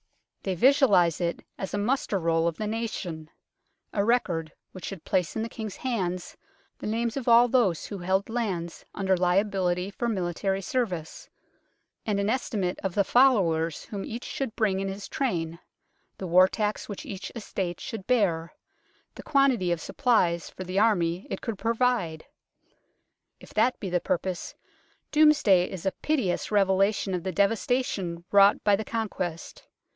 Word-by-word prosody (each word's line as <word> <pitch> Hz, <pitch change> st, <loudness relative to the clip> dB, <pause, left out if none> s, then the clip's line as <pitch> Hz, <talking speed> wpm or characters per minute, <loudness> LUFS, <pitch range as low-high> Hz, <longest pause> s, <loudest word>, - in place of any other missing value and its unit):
They 190 Hz, -2 st, -2 dB
visualize 195 Hz, -, +4 dB
it 170 Hz, -1 st, -2 dB
as 195 Hz, +1 st, -3 dB
a -, -, -1 dB
muster 215 Hz, 0 st, 0 dB
roll 165 Hz, -1 st, +1 dB
of 170 Hz, -, -2 dB
the 215 Hz, -, -3 dB
nation; 210 Hz, -8 st, -4 dB, 0.6 s
a 200 Hz, -, +1 dB
record 180 Hz, -9 st, 0 dB, 0.2 s
which 185 Hz, -, -9 dB
should 195 Hz, -5 st, -7 dB
place 180 Hz, -4 st, 0 dB
in 220 Hz, -, -1 dB
the 230 Hz, -, -4 dB
King's 220 Hz, -3 st, -6 dB
hands 185 Hz, -8 st, -3 dB, 0.4 s
the -, -, -5 dB
names 230 Hz, +2 st, -1 dB
of 270 Hz, -3 st, -4 dB
all 235 Hz, +1 st, +7 dB
those 230 Hz, -10 st, +2 dB
who 200 Hz, -, -6 dB
held 190 Hz, +2 st, 0 dB
lands 195 Hz, -8 st, -3 dB
under 190 Hz, -1 st, +2 dB
liability 180 Hz, 0 st, +1 dB
for 235 Hz, +3 st, -2 dB
military 190 Hz, 0 st, -1 dB
service, 185 Hz, -12 st, -3 dB, 0.7 s
and 205 Hz, -2 st, -1 dB
an 200 Hz, +2 st, +1 dB
estimate 200 Hz, -8 st, -2 dB
of 190 Hz, -2 st, -3 dB
the 200 Hz, -, +4 dB
followers 185 Hz, -, +3 dB
whom 200 Hz, -2 st, -5 dB
each 235 Hz, +2 st, -6 dB
should 265 Hz, -5 st, -4 dB
bring 200 Hz, -4 st, +1 dB
in 195 Hz, -, -2 dB
his 195 Hz, +1 st, -6 dB
train, 170 Hz, -11 st, -2 dB, 0.6 s
the 190 Hz, -, -5 dB
war 180 Hz, +1 st, +6 dB
tax 210 Hz, +2 st, -2 dB
which 205 Hz, -, -6 dB
each 195 Hz, -2 st, -6 dB
estate 190 Hz, -6 st, -4 dB
should 220 Hz, -7 st, -7 dB
bear, 180 Hz, -10 st, +1 dB, 0.6 s
the -, -, -9 dB
quantity 265 Hz, -11 st, +2 dB
of 170 Hz, -, 0 dB
supplies 180 Hz, -, +1 dB
for 185 Hz, -, -8 dB
the 185 Hz, +2 st, -1 dB
Army 180 Hz, -5 st, +2 dB
it -, -, -4 dB
could 225 Hz, -5 st, -4 dB
provide. 230 Hz, -9 st, 0 dB, 1.1 s
If -, -, -15 dB
that 230 Hz, +4 st, +2 dB
be 190 Hz, -, -5 dB
the 180 Hz, -1 st, +1 dB
pur 185 Hz, -, +1 dB
pose, 180 Hz, 0 st, -5 dB, 0.6 s
Domesday 295 Hz, -13 st, +5 dB
is 185 Hz, -2 st, -7 dB
a 190 Hz, -, +2 dB
pitiless 255 Hz, -12 st, -1 dB
revelation 195 Hz, 0 st, +2 dB
of 180 Hz, -, -1 dB
the 190 Hz, -, -3 dB
devastation 200 Hz, -4 st, 0 dB
wrought 200 Hz, 0 st, +6 dB
by 205 Hz, -1 st, +5 dB
the 215 Hz, -, -3 dB
Conquest. 185 Hz, -7 st, -4 dB
195 Hz, 160 wpm, -27 LUFS, 180-225 Hz, 1.1 s, all